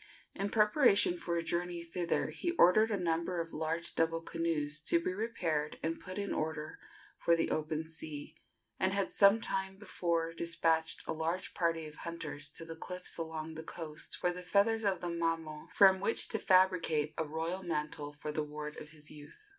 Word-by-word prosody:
In 200 +1 -2
preparation 210 - +4
for 170 -1 -2
a 165 - -1
journey 175 0 -2
thither 170 0 -1
he 345 - -2
ordered 215 - +6
a 210 - 0
number 170 0 -1
of 165 0 -4
large 160 +2 -1
double 165 0 +1
canoes 155 -3 -1
to 170 - +5
be 180 +2 -2
repaired 175 -8 -2
and 165 +1 -1
put 185 +1 -7
in 200 0 -2
order 155 -1 -3 0.4
for 170 - +4
the 165 - 0
open 155 +1 -2
sea, 155 -2 -6 0.4
and 190 0 +2
had 200 -1 0
some 200 +2 +6
time 190 -3 -2
before 170 -4 -1
despatched 165 -1 +1
a - - -2
large 165 +3 -2
party 165 -2 0
of 150 -1 -10
hunters 165 -3 -4
to 165 +3 -8
the 165 0 -7
cliffs 180 +2 -3
along 160 -1 -4
the 160 - -6
coast 160 -1 -5
for 180 - +1
the 180 - -6
feathers 205 +5 +2
of 195 -2 +1
the 175 - -2
mamo, 165 -2 -2
from 190 -1 +6
which 200 +4 +3
to 220 - 0
fabricate 180 -6 +3
a - - +2
royal 160 +4 -3
mantle 150 -4 -3
for 150 +1 -6
the 155 - -1
ward 150 0 -6
of 150 - -10
his 150 -1 -8
youth. 150 - -13
165 Hz, 185 wpm, -33 LUFS, 155-185 Hz, 0.4 s, ordered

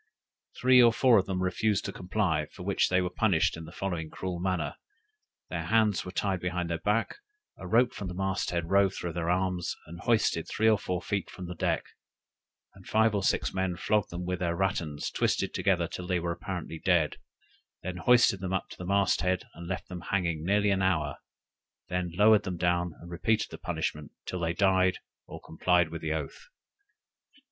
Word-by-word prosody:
Three 125 0 +6
or 120 -1 +7
four 115 0 +5
of 95 - -2
them 95 -1 -1
refused 100 +3 0
to - - -4
comply, 90 -5 -1
for 90 - -11
which 100 +1 +1
they 95 0 +3
were 90 - -1
punished 95 -4 +2
in 80 0 -8
the 80 - -11
following 85 -4 -3
cruel 90 0 -5
manner: 90 -5 -2 0.7
their - - -3
hands 110 -4 +2
were 90 - -7
tied 95 0 -1
behind 90 -1 -2
their 85 - -1
backs, 105 - 0 0.4
a 95 - -7
rope 120 +5 +3
from 100 - -5
the 90 - -6
masthead 95 -3 -2
rove 100 -1 +4
through 85 -1 -4
their 85 0 -2
arms, 90 -1 0
and 85 +2 -10
hoisted 105 -6 +1
three 110 - +1
or 110 -2 +5
four 90 -2 -3
feet 100 -1 -2
from 90 - -8
the 90 - -5
deck, 85 - 0 0.9
and 95 -1 -16
five 110 0 +3
or 100 - 0
six - - +1
men 95 -1 -1
flogged 105 +3 +1
them 90 +1 -5
with 90 0 -2
their 85 -1 0
rattans 85 -5 -1
twisted - - 0
together - - +1
till 90 - -7
they 90 -1 +1
were 85 0 -2
apparently 85 -2 -5
dead; 85 -5 +2 0.7
then 90 0 -4
hoisted 120 -1 +4
them 95 0 -3
up 95 - -2
to - - -11
the 90 - -6
mast 100 -2 +2
head, 90 +1 0
and 85 +1 -9
left 95 +1 -4
them 90 -2 -7
hanging 85 -5 0
nearly 100 +3 +2
an 95 -1 +1
hour, 85 -6 0 0.7
then 90 -1 -2
lowered 105 +2 +6
them 95 -3 -4
down, 85 0 +1
and 85 +1 -11
repeated 110 +6 0
the - - -7
punishment, 80 -3 -3
till 90 - -4
they 85 -1 0
died 95 -1 +3 0.3
or - - -8
complied 90 +1 +1
with 85 0 -6
the 80 - -2
oath. 80 - -5
90 Hz, 200 wpm, -29 LUFS, 85-100 Hz, 0.9 s, or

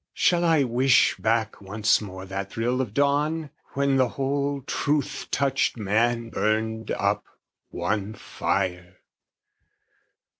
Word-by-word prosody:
Shall 175 -1 +3
I 165 -4 +4
wish 125 +1 +3
back 110 -1 0
once 105 +3 +1
more 95 -2 -8
that 95 +1 -5
thrill 120 +3 0
of 120 -6 -3
dawn? 145 +4 +1 0.2
When 140 -1 +2
the 130 -1 +4
whole 140 +2 -2
truth 145 +1 -1
touched 135 -2 +1
man 115 +2 0
burned 110 +1 -1
up, - - 0 0.5
one 105 +1 -2
fire? 90 0 -2
120 Hz, 115 wpm, -25 LUFS, 105-140 Hz, 0.5 s, I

